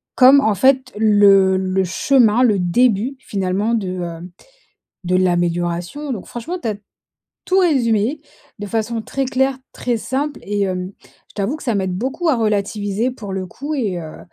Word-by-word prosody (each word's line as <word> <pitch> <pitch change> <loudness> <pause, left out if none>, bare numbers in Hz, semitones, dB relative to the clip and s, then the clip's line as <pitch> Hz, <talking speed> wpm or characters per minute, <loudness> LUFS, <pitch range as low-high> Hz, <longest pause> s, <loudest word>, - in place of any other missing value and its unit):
comme 270 +2 +7
en 220 -4 +2
fait 260 +5 +2
le 200 -3 +5
le 190 0 0
chemin, 240 +4 +3
le 210 -5 +3
début 225 +7 +1
finalement 200 +1 -2
de, 210 -5 -1 0.2
hem, 170 +1 -7 0.7
de 180 +1 +1
l'amélioration, 175 - -1
donc 200 - -6
franchement, 330 +10 -6
tu 230 - -2
as 210 - -1 0.7
tout 380 +1 +2
résumé, 260 - +1 0.4
de 205 - -5
façon 225 +1 -2
très 270 +4 -3
claire, 265 +1 0 0.2
très 240 -2 -2
simple 280 +5 -3
et 205 0 -2
hem, 185 0 -3
je - - -25
t'avoue 215 +9 -2
que - - -12
ça 235 -4 0
m'aide 190 -2 -1
beaucoup 270 - -1
à 275 - +3
relativiser 210 +1 -1
pour 205 -6 -8
le 190 -1 -3
coup 285 - -6
et 205 -10 -2
heu, 155 -2 -9
215 Hz, 170 wpm, -19 LUFS, 190-260 Hz, 0.7 s, comme